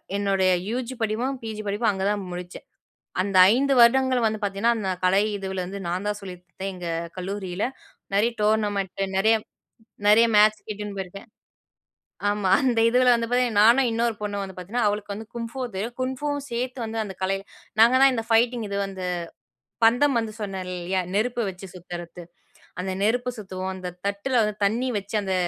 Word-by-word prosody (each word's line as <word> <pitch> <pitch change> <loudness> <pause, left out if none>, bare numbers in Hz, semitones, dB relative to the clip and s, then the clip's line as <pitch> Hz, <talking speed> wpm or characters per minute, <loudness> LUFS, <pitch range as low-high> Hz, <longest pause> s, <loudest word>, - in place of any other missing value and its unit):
என்னுடைய 195 -2 +2 0.2
யூஜி 250 +1 -3
படிப்பும், 235 +5 -1
பிஜி 220 -1 -5
படிப்பும், 210 +3 +1
அங்க 190 -1 -4
தான் 205 -1 0
முடிச்சேன். 180 0 -8 0.6
அந்த 195 0 -2 0.2
5 275 +2 +2
வருடங்கள் 255 +1 +5
வந்து 215 -1 0
பாத்தீங்கன்னா 200 +4 +1
அந்த 200 -4 -2
கலை 185 +2 +4 0.2
இதுவுல 190 -1 -4
வந்து 200 +2 -6
நான் 180 +4 -2
தான் 210 0 -1
சொல்லிக்குடுத்தேன் 185 +1 -7
எங்க 180 -2 -7 0.3
கல்லூரியில. 190 0 -4 0.5
நெறைய 220 +4 +3
டோர்னமென்ட்டு, 205 -3 0
நெறைய 220 +4 +4 0.7
நெறைய 225 +3 +7
மேட்ச்க்கு 215 +1 +4
இட்டின்னு 205 -1 -6
போயிருக்கேன். 195 +4 -7 1.0
ஆமா, 205 -2 0
அந்த 240 -3 +2
இதுவுல 250 +1 +4
வந்து 230 0 -2
பாத்தா, 250 0 +3 0.2
நானும் 240 +3 +5
இன்னொரு 230 0 0
பொண்ணும் 205 -1 -2
வந்து 190 -1 -8
பாத்தீங்கன்னா, 210 +6 -2
அவளுக்கு 205 0 -3
வந்து 220 +2 -8
குங்ஃபூ 235 +3 -5
தெரியும். 230 +5 -4
குங்ஃபூவும் 285 +2 -2
சேர்த்து 250 +2 -3
வந்து 225 0 -4
அந்த 190 -3 -8
கலையில, 195 +1 -1 0.4
நாங்க 240 +3 +7
தான் 270 0 +7
இந்த 225 -2 -2
ஃபைட்டிங் 230 0 +3
இது 200 - -2
வந்து, 190 -2 -6 0.8
பந்தம் 245 +3 +4
வந்து 220 -1 -4
சொன்னேன் 190 -2 -4
இல்லையா, 180 +2 -1
நெருப்ப 235 +1 0
வச்சு 190 +1 -9
சுத்துறத்து. 175 0 -8 0.6
அந்த 190 +1 -3
நெருப்பு 245 +3 +1
சுத்துவோம். 190 -2 -5
அந்த 180 -1 -5 0.2
தட்டில 200 +6 -2
வந்து 210 0 -2
தண்ணி 245 +5 0
வச்சு 200 +2 -5
அந்த, 190 -1 -1
210 Hz, 165 wpm, -25 LUFS, 190-235 Hz, 1.0 s, நெறைய